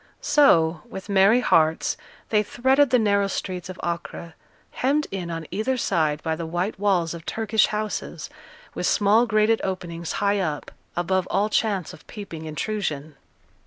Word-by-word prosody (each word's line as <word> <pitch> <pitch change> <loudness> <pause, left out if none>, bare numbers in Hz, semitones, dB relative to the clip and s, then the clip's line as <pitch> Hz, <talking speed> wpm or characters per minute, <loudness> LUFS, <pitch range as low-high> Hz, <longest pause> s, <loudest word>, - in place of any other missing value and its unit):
So, 170 - +4
with 190 +2 -8
merry 200 +5 +5
hearts, 160 -8 +2 0.3
they 210 -1 +3
threaded 265 +6 +2
the 255 - +4
narrow 200 -3 +2
streets 185 -2 -4
of 185 - -8
Acre, 170 -1 -5 0.4
hemmed 285 +4 +1
in 185 -3 -4
on 165 -1 -5
either 220 +8 -1
side 155 -9 0
by 160 -1 -1
the 165 0 -5
white 175 +5 -2
walls 185 -5 +1
of 170 -1 -8
Turkish 220 +3 +1
houses, 215 0 -4 0.5
with - - -2
small 215 +4 +4
grated 215 0 +2
openings 170 -3 -4
high 200 0 +1
up, 155 -6 -3 0.2
above 185 +2 0
all 210 +2 +1
chance 205 -6 0
of 150 - -15
peeping 170 -7 -8
intrusion. 155 -3 -3
195 Hz, 155 wpm, -24 LUFS, 170-215 Hz, 0.5 s, merry